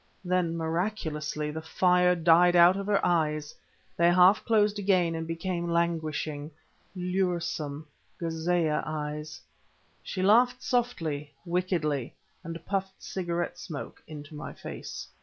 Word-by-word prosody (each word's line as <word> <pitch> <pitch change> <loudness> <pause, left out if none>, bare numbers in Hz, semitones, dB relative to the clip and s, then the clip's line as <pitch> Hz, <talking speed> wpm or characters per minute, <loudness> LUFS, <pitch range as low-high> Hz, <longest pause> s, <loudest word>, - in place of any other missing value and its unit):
Then, 180 -2 +1
miraculously, 160 -3 -2
the 160 +1 -5
fire 180 +2 +3
died 175 +1 +5
out 175 +1 +7
of 200 0 -4
her 205 -1 +2
eyes; 155 -3 0 0.4
they 170 +1 +4
half 185 +3 +6
closed 210 -2 +2
again 185 -4 +2
and 165 0 -4
became 170 +1 -3
languishing, 160 -3 -1 0.5
luresome 175 -5 -2 0.3
Ghâzeeyeh 165 -1 0
eyes. 150 0 -5 0.6
She 185 - -4
laughed 245 +5 +4
softly, 160 - -1
wickedly, 170 -7 -1 0.3
and 165 0 -7
puffed 190 -1 -3
cigarette 175 -1 -3
smoke 160 -5 -7
into 150 0 -9
my 150 - -7
face. - - -7
170 Hz, 120 wpm, -28 LUFS, 155-185 Hz, 0.6 s, out